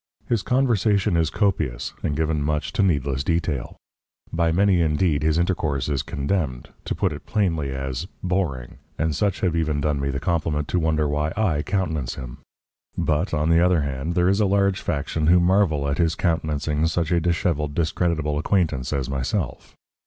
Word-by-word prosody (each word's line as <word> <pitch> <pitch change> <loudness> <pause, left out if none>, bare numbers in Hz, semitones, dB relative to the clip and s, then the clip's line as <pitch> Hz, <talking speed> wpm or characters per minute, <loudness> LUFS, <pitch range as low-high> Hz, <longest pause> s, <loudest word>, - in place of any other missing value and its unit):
His 115 -4 +1
conversation 110 -8 +2
is 80 -2 +2
copious 80 - -1
and 75 - -1
given 80 -1 0
much 75 +1 -1
to - - +1
needless 70 -7 +1
detail. 80 -5 -2 0.6
By 85 0 +2
many, 95 0 +3
indeed, 75 -1 +1
his 80 +1 +2
intercourse 80 -7 0
is 70 -3 0
condemned, 70 -2 -2 0.2
to - - -2
put - - 0
it - - -10
plainly, 80 -9 0
as 65 +4 -4 0.2
"boring," 85 -11 -2 0.2
and 80 -2 0
such 100 +1 0
have 90 -3 +1
even 80 -3 0
done 75 -1 0
me 70 - -1
the 70 0 -2
compliment 75 -3 -1
to 90 - +1
wonder 80 -2 +1
why 75 +1 -1
I 90 -9 +1
countenance 80 -9 -2
him. 60 -3 -8 0.6
But, 80 +5 0
on 75 0 0
the 85 +1 +5
other 90 -3 +3
hand, 70 +4 -3
there 90 -1 +3
is 100 +2 +2
a 105 - +3
large 100 0 +2
faction 75 0 -1
who 90 +2 +6
marvel 85 -5 +2
at 70 0 -1
his 85 -1 +2
countenancing 80 -2 0
such 85 0 -1
a 85 - +3
dishevelled, 85 -4 0
discreditable 80 -2 0
acquaintance 75 -7 0
as 70 -4 -1
myself. 70 - -3
80 Hz, 175 wpm, -23 LUFS, 70-90 Hz, 0.6 s, who